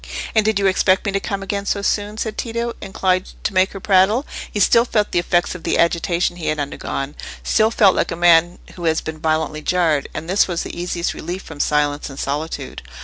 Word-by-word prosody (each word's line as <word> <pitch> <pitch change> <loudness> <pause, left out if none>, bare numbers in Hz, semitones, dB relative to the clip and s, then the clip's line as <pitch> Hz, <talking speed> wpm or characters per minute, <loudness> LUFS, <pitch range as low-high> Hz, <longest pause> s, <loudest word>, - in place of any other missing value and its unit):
"And 220 - +4
did 215 -1 +1
you 200 - 0
expect 190 0 +3
me 200 - 0
to 195 - 0
come 195 0 -4
again 200 +1 -3
so 200 - -1
soon?" 205 +1 -1
said 220 -1 -3
Tito, 235 0 -3
inclined 185 -1 -1
to - - -1
make 185 0 +3
her 195 - -6
prattle. 200 +7 +3 0.3
He 210 - -3
still 230 +4 +5
felt 215 -4 0
the - - +2
effects 175 0 +1
of 180 - -8
the - - 0
agitation 170 +1 +1
he 165 - -5
had 155 - 0
undergone—still 145 +9 -2
felt 205 -4 +4
like - - 0
a - - -2
man 175 0 +4 0.2
who 175 - -7
has 160 -1 +2
been 160 0 -7
violently 155 -1 -1
jarred; 160 -4 +1
and 160 - -6
this 190 +3 +3
was 175 -2 -2
the - - -7
easiest 175 0 -2
relief 180 +4 -6
from 155 -3 -11
silence 145 0 0
and 135 - -10
solitude. 145 -1 -4
180 Hz, 215 wpm, -20 LUFS, 160-200 Hz, 0.3 s, still